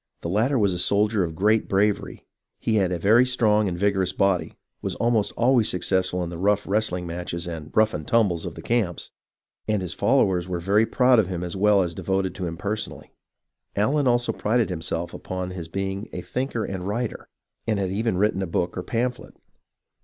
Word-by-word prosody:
The 85 - -4
latter 115 +9 +2
was 100 -5 +2
a 90 - -3
soldier 105 +2 +2
of 80 -2 -4
great 105 +5 +2
bravery, 100 +1 0 0.3
he 110 - 0
had 95 -3 +2
a 90 - 0
very 110 +8 +5
strong 110 -4 +2
and 85 -2 -3
vigorous 95 -1 +1
body, 95 -2 +1 0.3
was - - -3
almost 115 -3 +1
always 120 -2 +3
successful 90 0 0
in 85 - -5
the 85 - -6
rough 105 +2 +2
wrestling 95 -4 0
matches 85 0 -4
and 80 -3 -6
" - - -35
rough 110 0 +4
and 75 0 -5
tumbles 100 -8 +2
" - - -3
of - - -7
the - - -9
camps, 110 -8 -1 0.6
and 105 -1 +1
his 90 - -3
followers 90 -2 +2
were 90 -1 -2
very 100 +6 +2
proud 125 +1 +4
of 105 - +2
him 90 -2 -4
as 90 +1 -5
well 100 0 +4
as 85 -1 -3
devoted 95 +2 -1
to 95 -2 -4
him 85 0 -5
personally. 105 +4 -5 0.6
Allen 135 +7 +2
also 120 -1 +2
prided 110 -1 0
himself 85 0 -3
upon 95 0 -5
his 90 -3 -6
being 95 +4 -4
a 90 - -5
thinker 125 0 -3
and 95 -1 -5
writer, 115 +3 -3 0.4
and 110 -2 +1
had 95 -2 -1
even 110 -1 0
written 100 -1 +1
a 95 - -2
book 85 +1 -1
or 90 - -3
pamphlet. 120 +5 -3
100 Hz, 205 wpm, -24 LUFS, 90-110 Hz, 0.6 s, very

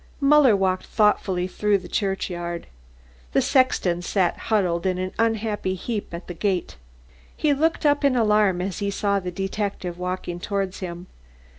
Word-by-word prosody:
Muller 280 -5 +6
walked 185 -1 0
thoughtfully 195 -4 +2
through 205 +2 +1
the 185 -2 -10
churchyard. 175 -3 -2 0.7
The - - +4
sexton 195 -10 +2
sat 180 0 +1
huddled 185 -5 +1
in 185 -1 0
an 185 0 -3
unhappy 220 -4 0
heap 210 +3 -4
at 170 +1 -7
the 175 - -6
gate. 185 0 -1 0.6
He 300 -2 +2
looked 320 +3 0
up 290 0 +3
in 280 -2 +3
alarm 210 -5 +3
as 190 -1 -4
he 200 - -1
saw 200 0 0
the 180 -1 -5
detective 195 -1 -3
walking 180 -1 -4
towards 195 0 -2
him. 175 -1 -6
195 Hz, 155 wpm, -24 LUFS, 180-215 Hz, 0.7 s, Muller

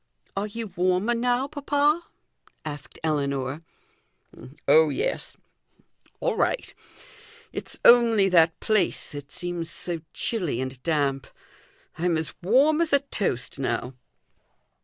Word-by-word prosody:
"Are 200 +2 -1
you 215 -1 -6
warmer 185 +6 +2
now, 245 +2 +1
papa?" 290 +2 +1 0.6
asked 145 -2 -6
Ellinor. 140 -2 -1 1.1
"Oh, 480 -1 +6
yes! - - -2 0.8
All - - 0
right. - - 0 0.8
It's - - -5
only 230 -4 +7
that 165 -2 +4
place 215 -5 +1
that 145 -2 -8
seems 175 -2 -3
so 170 +2 -3
chilly 180 - -1
and 130 0 -5
damp. 140 -4 0 0.7
I'm 170 -1 +1
as 160 -1 -3
warm 275 - +4
as 325 -3 0
a 280 - +5
toast 195 - -2
now." 125 0 -2
180 Hz, 115 wpm, -25 LUFS, 145-240 Hz, 1.1 s, only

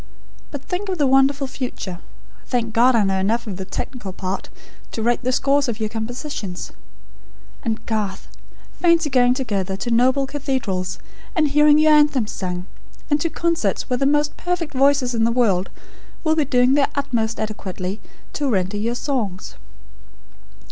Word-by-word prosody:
But 285 -2 -7
think 385 +2 -3
of 370 - -1
the 295 - +2
wonderful 270 +1 +3
future. 245 -9 -5 0.5
Thank 230 -3 -1
God, 245 +2 +5
I 220 - +4
know 195 -1 +1
enough 225 +5 0
of 200 -5 -5
the 190 - -5
technical 210 0 -5
part, 185 0 -4 0.4
to 225 - -3
write 240 +2 +1
the 255 - +1
scores 275 +2 +2
of 225 -1 -3
your 215 -1 -1
compositions. 225 - -5 0.9
And, 225 -2 -3
Garth, 210 -4 -3 0.5
fancy 335 -4 +3
going 250 -1 +4
together 200 -7 -2
to 240 - -3
noble 260 +4 +3
cathedrals, 260 -10 -2 0.4
and 310 -4 +3
hearing 295 +1 +5
your 310 0 +5
anthems 295 -7 +3
sung; 180 -1 -4 0.5
and 290 0 +3
to 335 - +1
concerts 325 - -1
where 250 - +2
the 275 - +2
most 295 +1 +2
perfect 355 -4 -2
voices 270 -1 +3
in 225 -1 +1
the 230 - +3
world 205 -7 +2 0.5
will 315 -1 +2
be 310 -2 +2
doing 250 -1 +3
their 280 -1 +3
utmost 235 -5 -1
adequately 200 -2 -4 0.3
to 290 -2 -1
render 195 -2 0
your 230 +3 -1
songs. 240 -9 -3
250 Hz, 160 wpm, -21 LUFS, 210-285 Hz, 0.9 s, God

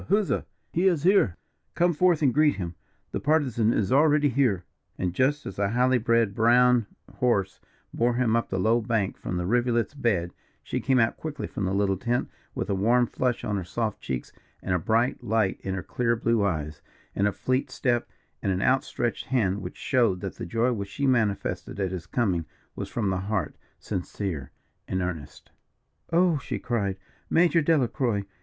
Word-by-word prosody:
huzza! 205 +1 +2 0.3
He 180 +3 +3
is 170 -6 +2
here 180 - +4 0.4
come 175 0 +3
forth 170 -1 +3
and 130 -4 +4
greet 150 +2 +4
him. 90 -3 -4 0.4
The - - -2
Partisan 130 -7 +2
is 100 -4 0
here 130 - +4
already." 140 - +3 0.4
And 90 -2 -1
just 140 +6 +1
as - - -7
the 100 0 +1
highly 125 +2 +3
bred 115 -3 +2
brown 120 +1 +4 0.3
horse 100 -6 +1 0.3
bore 120 +1 +1
him 120 -2 +2
up 115 - 0
the 95 - -2
low 110 +5 +2
bank 110 -4 -1
from 90 - -4
the 90 - -2
rivulet's 120 +4 +1
bed, 100 -11 0 0.3
she - - -3
came 130 -1 +2
out 115 -2 +2
quickly 150 -3 -5
from 100 - -4
the 95 - -1
little 100 -1 +1
tent 120 +5 -1 0.2
with - - -2
a 100 - 0
warm 120 +6 +3
flush 125 0 -1
on 105 -1 -1
her 95 - -3
soft 110 +4 -3
cheeks 65 -2 -4 0.3
and 90 - -1
a 90 - +2
bright 115 +8 +1
light 110 -3 +1
in 95 -1 -3
her 95 - -4
clear 120 -1 0
blue 115 -1 +1
eye, 80 -6 -1 0.4
and 100 - +1
a - - +1
fleet 130 +5 -1
step, 120 -3 0 0.3
and 100 - 0
an 90 - 0
out 130 +1 +3
stretched 120 -1 -3
hand, 105 -6 +1
which 90 -1 -7
showed 115 -9 +1
that 95 - -4
the - - -5
joy 115 +7 +1
which 100 -3 -4
she 140 +6 -2
manifested 110 -6 0
at 95 -2 -1
his 90 -3 -6
coming 90 -9 0 0.3
was - - -5
from 105 -5 -1
the 95 - 0
heart, 100 0 -2 0.2
sincere 90 -6 -4 0.4
and 95 - -1
earnest. 85 -5 -6 0.6
"Oh!" 170 -2 +3
she - - -4
cried, 100 -6 -2 0.3
"Major 170 0 +4
Delacroix!" 125 -8 +1
115 Hz, 190 wpm, -26 LUFS, 95-130 Hz, 0.6 s, here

